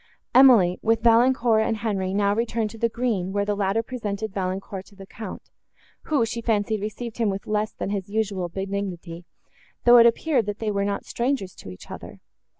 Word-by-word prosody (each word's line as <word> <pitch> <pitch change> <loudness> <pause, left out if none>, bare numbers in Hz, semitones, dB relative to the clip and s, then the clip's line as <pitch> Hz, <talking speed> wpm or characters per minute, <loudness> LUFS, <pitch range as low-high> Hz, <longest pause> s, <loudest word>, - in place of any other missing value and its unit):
Emily, 235 -9 +6
with 225 0 +1
Valancourt 235 -1 +4
and 220 0 0
Henri, 200 -4 -2
now 200 0 +2
returned 225 -1 -1
to 225 - -11
the 230 - +1
green, 220 -6 -1
where 200 +1 0
the 205 0 -1
latter 200 +3 0
presented 220 -4 -4
Valancourt 190 0 -4
to 200 - -19
the 195 0 -11
Count, 210 0 -9 0.5
who, 285 -7 +2
she 230 +1 -4
fancied, 215 -2 0
received 215 +2 -6
him 225 -3 +2
with 195 0 -4
less 215 0 -1
than 195 - -5
his 200 -2 -3
usual 200 -4 -2
benignity, 190 -2 -5 0.6
though 245 0 +8
it 235 - +8
appeared, 245 -1 +1
that 205 0 -3
they 220 -1 -2
were 200 -1 0
not 200 0 -3
strangers 240 -6 -2
to - - -11
each 90 - -12
other. - - -9
210 Hz, 190 wpm, -24 LUFS, 195-230 Hz, 0.6 s, though